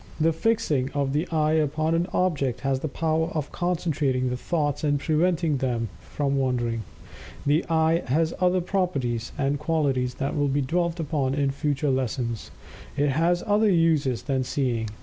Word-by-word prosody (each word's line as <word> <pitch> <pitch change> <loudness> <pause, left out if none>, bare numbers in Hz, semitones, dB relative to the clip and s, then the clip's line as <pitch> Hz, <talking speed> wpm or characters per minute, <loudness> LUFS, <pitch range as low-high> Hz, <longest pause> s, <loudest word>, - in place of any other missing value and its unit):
The 160 +1 +3
fixing 160 - +1
of 140 -2 0
the 155 +5 0
eye 155 -2 +1
upon 155 +1 +1
an 170 +2 +1
object 140 -9 0
has 135 -1 0
the 155 - -3
power 160 +2 0
of 150 -2 -2
concentrating 150 -8 0
the - - -1
thoughts 145 +2 -1
and 145 -1 +2
preventing 160 0 +1
them 120 -4 -1
from 140 -1 -2
wandering. 120 -3 0 0.6
The 150 +4 +3
eye 160 +1 +3
has 160 +5 +1
other 180 0 +3
properties 140 - -1
and 140 +1 0
qualities 140 -5 0
that 135 +2 -2
will 145 -1 +1
be 140 +1 +1
dwelt 170 +5 -1
upon 145 -4 -1
in 140 -1 +1
future 145 0 0
lessons. 125 -3 -2 0.5
It 145 0 +2
has 170 +5 +1
other 210 +1 +3
uses 160 - +2
than 135 -2 0
seeing. 125 -4 -1
145 Hz, 165 wpm, -25 LUFS, 130-165 Hz, 0.6 s, The